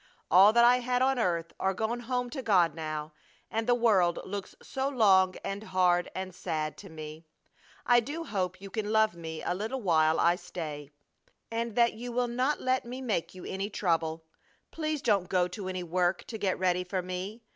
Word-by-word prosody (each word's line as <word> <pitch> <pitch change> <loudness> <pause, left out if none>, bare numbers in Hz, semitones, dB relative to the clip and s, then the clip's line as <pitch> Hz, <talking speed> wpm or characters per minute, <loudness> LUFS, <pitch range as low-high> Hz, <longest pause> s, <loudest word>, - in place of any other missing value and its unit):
All 190 +5 +8
that 235 0 +6
I 245 +1 +6
had 250 +1 0
on 265 -1 +2
earth 170 -5 -1
are 190 0 0
gone 225 +4 -1
home 250 0 -2
to 275 - -4
God 180 - +3
now, 155 -1 -5 0.4
and 225 0 -1
the 245 - +4
world 195 -8 +3
looks 200 0 -6
so 270 0 -3
long 190 -8 +4
and 195 +1 -4
hard 180 -1 +2
and 185 -1 -4
sad 155 -3 -3
to 195 - -11
me! 155 0 -9 0.6
I 245 -1 +6
do 290 +8 -4
hope 185 - -2
you 195 0 -10
can 215 -1 -2
love 220 -2 +3
me 160 -2 -7
a - - 0
little 220 +8 -3
while 160 -3 +3
I 175 +1 +4
stay, 150 -6 -7 0.6
and 230 -1 -2
that 235 -1 +4
you 240 +2 -7
will 245 +1 0
not 255 +5 0
let 255 0 +1
me 250 +2 -7
make 190 -9 -2
you 185 - -9
any 195 +2 -3
trouble. 165 -5 -1 0.5
Please 310 -3 -3
don't 200 -6 +2
go 180 -1 +2
to 190 +1 -6
any 185 -1 -3
work 175 +1 0
to 220 - -7
get 190 -3 0
ready 180 -1 +1
for 185 0 -3
me. 185 +5 -5
195 Hz, 200 wpm, -29 LUFS, 175-235 Hz, 0.6 s, All